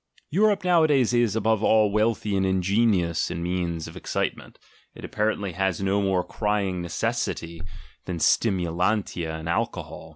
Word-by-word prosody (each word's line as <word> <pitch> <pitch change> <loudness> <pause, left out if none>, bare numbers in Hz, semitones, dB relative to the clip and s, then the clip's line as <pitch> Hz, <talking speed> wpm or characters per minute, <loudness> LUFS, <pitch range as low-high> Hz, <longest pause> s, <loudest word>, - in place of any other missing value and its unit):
Europe 200 +3 +2
nowadays 155 -9 +3
is, 120 -3 +2
above 110 -1 +1
all, 110 -2 +4
wealthy 105 -1 0
and 95 - +1
ingenious 95 -2 +1
in 85 -1 -4
means 85 -2 -2
of - - -11
excitement; - - -4 0.4
it - - -9
apparently 105 -2 -1
has 95 0 -1
no 100 +1 +1
more 95 -2 +1
crying 100 -4 -1
necessity 85 0 -3 0.4
than 90 -2 -4
stimulantia 90 -2 0
and 80 +1 -7
alcohol. 85 - -3
100 Hz, 135 wpm, -25 LUFS, 90-110 Hz, 0.4 s, all